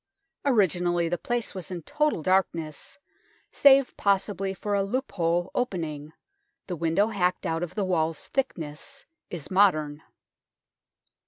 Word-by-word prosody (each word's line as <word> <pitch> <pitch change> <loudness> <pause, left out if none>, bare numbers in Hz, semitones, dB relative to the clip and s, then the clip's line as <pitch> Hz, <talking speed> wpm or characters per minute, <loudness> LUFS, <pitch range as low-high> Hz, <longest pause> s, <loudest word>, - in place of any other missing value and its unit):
Originally 175 - +2
the 175 +1 -1
place 240 -1 -2
was 185 -5 -6
in 175 -3 -6
total 295 - 0
darkness, 170 -5 0 0.5
save 275 -2 +5
possibly 195 -1 +1
for 205 +2 -4
a 200 - +3
loophole 185 -6 -1
opening; 160 -10 -3 0.5
the 180 - -4
window 170 +6 +1
hacked 180 -3 0
out 165 -1 -1
of 175 - -5
the 205 -3 0
wall's 165 -3 -1
thickness 260 - -4 0.2
is 175 -2 -7
modern. 155 -6 +3
180 Hz, 120 wpm, -27 LUFS, 165-205 Hz, 0.5 s, save